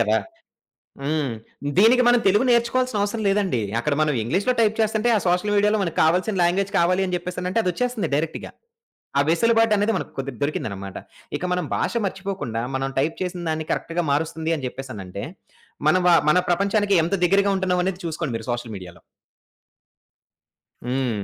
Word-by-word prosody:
కదా! 110 -1 +3 0.9
హ్మ్. 145 -2 -1 0.5
దీనికి 235 +5 +6
మనం 245 0 +5
తెలుగు 205 +6 +4
నేర్చుకోవాల్సిన 235 0 +2
అవసరం 205 +2 -1
లేదండి. 195 - +1 0.2
అక్కడ 145 +4 0
మనం 150 -1 +2
ఇంగ్లీష్‌లో 190 - +1
టైప్ 220 -1 +3
చేస్తంటే, 220 +2 +1
ఆ - - +4
సోషల్ 180 +4 +1
మీడియాలో 210 +1 +3
మనకి 170 -4 -4
కావాల్సిన 185 +6 +2
లాంగ్వేజ్ 190 +3 +1
కావాలి 180 +2 +2
అని 180 - -1
చెప్పేనంటే, 180 +3 -3
అదొచ్చేస్తుంది 210 0 -1
డైరెక్ట్‌గా. 160 +2 -3 0.7
ఆ - - +5
వెసులుబాటనేది 225 +3 +3
మనకు - - -4
కొద్దిగా 135 -3 -5
దొరికిందన్నమాట. 100 -9 -3 0.4
ఇక - - -5
మనం 180 0 0
భాష - - -1
మర్చిపోకుండా 190 - -4
మనం 135 0 -1
టైప్ 155 +4 +1
చేసిన 180 -1 -4
దాన్ని 155 0 -3
కరెక్ట్‌గా 170 +1 -2
మారుస్తుంది 160 +2 -1
అని 130 -3 -4
చెప్పేసనంటే, 100 -8 -7 0.7
మన 155 - +5
వ - - +6 0.2
మన 180 - +4
ప్రపంచానికి 200 +3 +2
ఎంత 170 - -1
దగ్గరగా 200 +3 +3
ఉంటున్నాం 185 -1 0
అనేది 190 -1 -2
చూసుకోండి 160 -6 -3
మీరు 110 - -8
సోషల్ 120 -2 -4
మీడియాలో. 90 -3 -11 1.9
హ్మ్. 125 -5 -1
180 Hz, 155 wpm, -23 LUFS, 140-205 Hz, 1.9 s, దీనికి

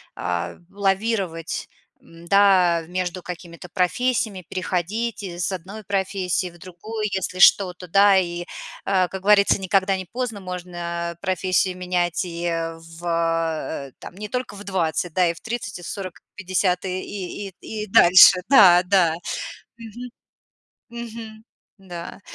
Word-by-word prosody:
а, 85 -1 -3
в 195 - -25
лавировать, 195 -4 -1 0.3
м, 165 0 -16
да, 185 -4 +4
между 180 0 -3
какими-то 175 0 -9
профессиями, 200 +2 0
переходить 200 +5 -2
из 175 -1 -3
одной 190 +4 -7
профессии 190 -2 -1
в 175 - -17
другую, 210 +5 -6
если 185 -1 -3
что-то, 180 -1 +5
да. 200 +2 +5
И, 175 -2 -1 0.4
э, 185 -2 +2
как 190 +1 -7
говорится, 200 0 +4
никогда 195 +1 +2
не 185 - -6
поздно, 230 0 -4
можно 175 -2 -5
профессии 185 0 +1
менять 180 -1 -1
и, 170 -1 -6
э, 165 -1 -2
в, 165 +1 -14 0.8
э, - - -16
там - - -10
не 210 +2 -6
только 250 -1 -4
в 205 - -9
20, 175 -3 -1
да, 180 0 +3
и - - -1
в 170 - -14
30, 230 -4 -5
и - - -11
в - - -7
40, 190 -4 -6
и - - -57
в - - -72
50, 185 -1 0
и 185 0 -2
и 200 0 -6
и 215 -1 -5
и 215 - -7
дальше. 185 0 +8
Да, 185 -9 +8
да, 180 -3 +3 0.6
мгм. 235 +2 -9 0.8
Мгм, 225 -2 -8 0.3
да. 175 -2 -9
185 Hz, 150 wpm, -23 LUFS, 175-200 Hz, 0.8 s, дальше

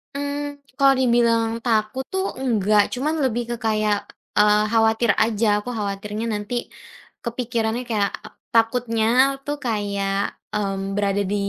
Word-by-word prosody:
Mmm, 285 0 -4
kalau 275 -1 +6
dibilang 235 -2 +3 0.2
takut 220 +2 +1
tuh 380 0 0 0.2
enggak 215 -5 +3
cuma 265 +4 -1
lebih 260 -6 0
ke - - -1
kayak, 215 -2 0 0.3
eee, 210 0 +5
khawatir 225 0 +3
aja. 220 0 0
Aku 245 - -7
khawatirnya 205 +1 -3
nanti 205 +2 -4 0.7
kepikirannya 235 -1 -2
kayak 205 -3 +1 0.4
takutnya 230 -1 +2 0.4
tuh 290 0 -2
kayak, 200 -3 -1 0.4
mmm, 195 -1 -2
berada 200 0 +1
di - - +1
225 Hz, 125 wpm, -22 LUFS, 210-245 Hz, 0.7 s, kalau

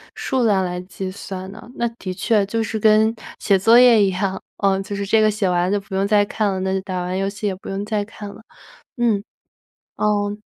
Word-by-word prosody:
数 260 -2 -1
量 200 -4 +3
来 180 -1 -3
计 185 +1 -6
算 190 0 -7
的。 220 +3 -12
那 235 - -1
的 185 - -4
确 205 +2 +1
就 225 +3 -1
是 220 0 -3
跟 215 +1 +4 0.3
写 195 -2 +2
作 225 +5 +6
业 245 -3 +7
一 200 - +4
样， 190 +1 -2 0.2
呃， 195 -1 +2
就 200 +1 -6
是 200 0 -3
这 220 +3 +3
个 215 - +4
写 205 -3 0
完 175 0 +1
就 205 +1 0
不 195 0 -13
用 195 +1 +1
再 205 0 +4
看 205 0 -1
了， 190 - -3
那 190 0 -1
就 190 - 0
打 190 -1 -4
完 180 +1 -3
游 195 0 0
戏 200 +2 -6
也 195 - -1
不 185 - -13
用 195 +1 -3
再 210 -1 -1
看 205 -1 -9
了， 200 - -12 0.6
嗯。 225 -4 +1 0.7
嗯。 205 0 0
200 Hz, 250 characters per minute, -21 LUFS, 190-215 Hz, 0.7 s, 业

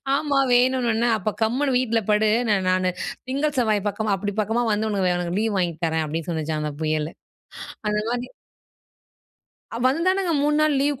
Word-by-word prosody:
"ஆமா 280 -1 +1
வேணும்னோன" 245 -2 +2 0.2
"அப்போ 215 +2 -2
கம்முனு 255 +6 +1
வீட்டுல 230 -3 +1
படு. 210 +1 +3 0.4
நானு 185 0 +1 0.4
திங்கள் 290 +2 -1
செவ்வாய் 215 -4 +1
பக்கமா, 215 0 -1
அப்படி 205 +2 -3
பக்கமா 225 +3 0
வந்து 215 +1 0
உனக்கு 185 -3 +1
உனக்கு 175 +2 -2
லீவ் 220 -2 0
வாங்கி 175 -2 -1
தரேன்." 160 -1 0
அப்படின்னு 160 +2 -4
சொல்லுச்சாம் 155 -1 -2
அந்த 150 - -2
புயல். 155 0 0 0.8
அந்த 210 0 0
மாரி 245 +1 -3 1.5
அ - - -3
வந்தானுங்க 350 +6 +1
3 295 0 +2
நாள் 305 -2 +3
லீவ் 285 -1 0
220 Hz, 160 wpm, -23 LUFS, 180-260 Hz, 1.5 s, படு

